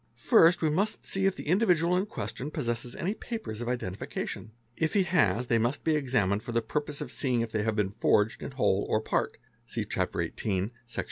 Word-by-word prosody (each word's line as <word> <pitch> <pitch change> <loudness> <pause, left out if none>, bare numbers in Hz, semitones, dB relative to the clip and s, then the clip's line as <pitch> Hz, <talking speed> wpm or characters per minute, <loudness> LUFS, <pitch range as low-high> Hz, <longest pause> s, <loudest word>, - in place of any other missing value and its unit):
First, 175 -8 +5
we 155 - +3
must 200 +7 0
see 195 0 +1
if 195 - +1
the - - -8
individual.in 180 0 +3
question 145 -8 -4
possesses 120 -5 -2
any 190 +5 -1
papers 220 - -6
of 120 - -3
identification, 110 -1 -4 0.2
If 160 +5 -1
he 200 - +5
has, 125 - +2
they 115 -1 +2
must 120 +5 0
be 160 -1 +2
examined 120 -8 +1
for 120 - -6
the 115 0 +1
purpose 145 +4 -3
of 135 -4 -5
see 130 -2 0
ing 120 - +2
if 115 -1 -3
they 110 - 0
have 110 0 0
been 105 -3 0
forged 105 +1 +2
in 140 - -6
whole 100 -6 +2
or 110 - +3
part 110 - -1 0.3
(see - - -3
Chapter - - -1
XVIII. 100 +1 -2 0.2
Sec. 115 - -6
125 Hz, 210 wpm, -29 LUFS, 110-170 Hz, 0.3 s, First